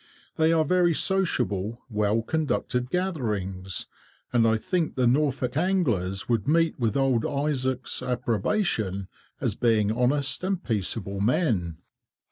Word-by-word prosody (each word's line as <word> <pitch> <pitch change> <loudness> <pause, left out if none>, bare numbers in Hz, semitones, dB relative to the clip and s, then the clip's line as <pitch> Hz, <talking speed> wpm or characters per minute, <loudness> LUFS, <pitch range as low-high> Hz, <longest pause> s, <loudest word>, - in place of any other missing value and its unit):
They 160 0 +3
are 160 -1 +3
very 175 0 +3
sociable, 120 - 0
well 105 -1 0
conducted 125 -4 -1
gatherings, 105 - -2 0.5
and 115 -2 +4
I 110 0 +3
think 180 +4 -1
the 130 - +2
Norfolk 130 -1 +1
anglers 125 - 0
would 115 -4 0
meet 165 0 +2
with 115 -2 0
old 130 -4 +2
Izaak's 130 -3 -1
approbation, 120 - -1 0.3
as - - 0
being 110 -3 +2
honest 130 +6 +1
and 190 -1 -1
peaceable 100 -2 -2
men." 100 - +1
125 Hz, 120 wpm, -26 LUFS, 105-155 Hz, 0.5 s, and